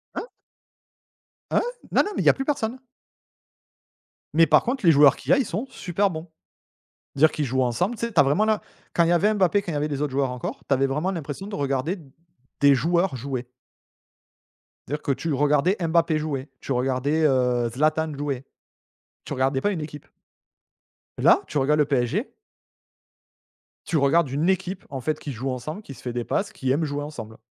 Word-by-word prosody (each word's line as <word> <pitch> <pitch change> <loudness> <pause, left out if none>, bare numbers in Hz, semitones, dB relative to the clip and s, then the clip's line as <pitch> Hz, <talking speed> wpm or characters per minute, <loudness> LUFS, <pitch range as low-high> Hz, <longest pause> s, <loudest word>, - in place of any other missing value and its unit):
Hein? - - -4 1.2
Hein? - - +3 0.3
Non, - - +4
non 415 - -4
mais - - 0
il - - -3
y - - +8
a - - +6
plus 270 - -4
personne. 260 -5 -1 1.6
Mais 165 +1 +5
par 155 +1 +5
contre 250 -3 -2
les 165 - +8
joueurs 140 -2 +6
qu'il - - -4
y - - +8
a, - - +5
ils 270 - +1
sont 210 +6 -3
super 200 -4 -1
bons. 165 -1 -7 0.9
Dire 155 +3 +5
qu'ils 150 - -2
jouent 130 +1 +1
ensemble 175 - 0
tu 230 - -3
sais, 230 - -6
tu 165 - +3
as 145 - +8
vraiment 145 +11 +2
l'im 215 -1 +1 0.3
quand 170 - +4
il 165 - +2
y - - +4
avait 205 +5 +3
Mbappé, 200 0 +2
quand 175 - -5
il - - -3
y - - +1
avait 150 +1 -1
les 140 -1 -3
autres 145 -3 -2
joueurs 135 -2 +1
encore 125 -1 -5
tu 140 - +2
avais 135 +1 +2
vraiment 150 +8 -1
l'impression 160 +1 -5
de 210 - -5
regarder 140 +6 -1 0.6
des 140 -1 +7
joueurs 170 +4 +1
jouer. 125 -1 -5 1.4
Dire 150 +3 -3
que 140 - -1
tu 160 +3 -2
regardais 150 +6 +2
Mbappé 165 -1 +2
jouer 145 -3 -3
tu - - -6
regardais, 135 +5 +1
heu, 125 -4 +2
Zlatan 155 +5 0
jouer. 140 -2 -3 0.8
Tu - - -6
regardais 135 +1 0
pas 205 - +2
une 170 - -3
équipe. 150 -1 -8 1.1
Là, - - +5
tu 150 - -3
regardes 150 +2 +2
le 150 - +4
PSG 140 - 0 1.5
tu 175 - -3
regardes 145 +2 +3
une 150 +7 0
équipe 190 0 -1
en 135 -2 -5
fait, 155 +3 -2
qui 145 - -6
joue 130 +2 -4
ensemble, 150 - -5
qui 140 - -10
se - - -14
fait 125 - -5
des 120 -1 -2
passes, 205 +1 -1
qui 130 -11 -2
aime 145 +5 +1
jouer 145 -1 -3
ensemble. 115 -7 -8
150 Hz, 205 wpm, -24 LUFS, 135-175 Hz, 1.6 s, y